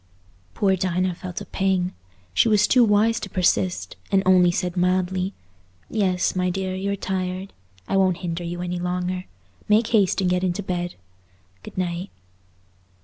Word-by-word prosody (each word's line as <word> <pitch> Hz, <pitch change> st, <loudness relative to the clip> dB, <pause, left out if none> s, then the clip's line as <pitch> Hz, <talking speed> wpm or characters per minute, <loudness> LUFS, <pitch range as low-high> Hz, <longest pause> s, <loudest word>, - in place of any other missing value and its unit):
Poor 195 Hz, -2 st, +3 dB
Dinah 185 Hz, 0 st, 0 dB
felt 180 Hz, 0 st, -6 dB
a -, -, -6 dB
pang. 190 Hz, -2 st, 0 dB, 0.4 s
She 110 Hz, -, +4 dB
was 210 Hz, -2 st, +5 dB
too 250 Hz, -2 st, +5 dB
wise 220 Hz, +1 st, +3 dB
to 200 Hz, -, -6 dB
persist, 185 Hz, 0 st, 0 dB
and 195 Hz, -1 st, +3 dB
only 185 Hz, -1 st, +6 dB
said 180 Hz, +1 st, -1 dB
mildly, 185 Hz, +1 st, 0 dB, 0.6 s
"Yes, 190 Hz, -5 st, +1 dB
my 180 Hz, 0 st, +1 dB
dear, 190 Hz, +1 st, -2 dB
you're 195 Hz, +2 st, -2 dB
tired; 185 Hz, 0 st, -3 dB, 0.3 s
I 195 Hz, -, +1 dB
won't 185 Hz, -2 st, +3 dB
hinder 170 Hz, 0 st, -3 dB
you 175 Hz, +1 st, -4 dB
any 180 Hz, 0 st, -3 dB
longer. 180 Hz, +1 st, -2 dB, 0.4 s
Make 220 Hz, +2 st, +4 dB
haste 205 Hz, -6 st, +3 dB
and 190 Hz, -, +1 dB
get 180 Hz, 0 st, +1 dB
into 185 Hz, +2 st, -1 dB
bed. 175 Hz, -1 st, -3 dB, 0.7 s
Good -, -, -11 dB
night." 180 Hz, +1 st, -2 dB
185 Hz, 155 wpm, -23 LUFS, 180-195 Hz, 0.7 s, only